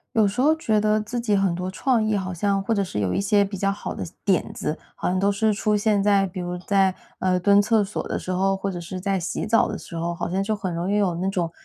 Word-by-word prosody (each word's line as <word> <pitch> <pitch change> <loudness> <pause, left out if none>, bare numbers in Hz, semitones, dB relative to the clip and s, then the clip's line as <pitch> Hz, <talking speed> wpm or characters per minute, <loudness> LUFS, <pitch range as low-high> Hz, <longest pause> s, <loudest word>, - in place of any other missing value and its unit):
有 215 -2 +4
时 250 +6 -1
候 310 +2 +5
觉 220 -9 0
得 215 0 +2
自 230 +3 -4
己 235 -3 +1
很 195 -3 +2
多 180 +1 -3
创 235 +2 +1
意 215 0 +1
好 185 -2 -2
像 195 +3 0
或 225 +3 0
者 200 -2 +1
是 140 - -4
有 95 -3 0
一 - - +1
些 205 +1 +3
比 195 0 -6
较 195 +1 0
好 205 - -5
的 - - -4 0.2
点 190 -4 +1
子， 155 - -3 0.2
好 - - -3
像 185 +1 0
都 200 +2 +2
是 215 +1 +1
出 210 +1 0
现 205 -1 +2
在 200 -1 +3
比 185 0 -8
如 180 0 -3
在， 190 0 +2 0.3
呃， 185 -1 +1
蹲 200 +2 +5
厕 220 +1 +3
所 200 +1 -4
的 - - -2
时 - - -6
候， 190 +1 +1
或 195 +1 -3
者 180 - -5
是 180 +2 -6
在 195 0 0
洗 175 +3 -3
澡 225 +1 +3
的 210 - -4
时 170 - -9
候， 170 +1 -2
好 - - -3
像 190 +2 0
就 215 +2 -1
很 190 -4 -4
容 175 +4 -2
易 - - +2
有 195 -4 +1
那 185 +3 -1
种 175 -4 -1
195 Hz, 310 characters per minute, -24 LUFS, 185-210 Hz, 0.3 s, 候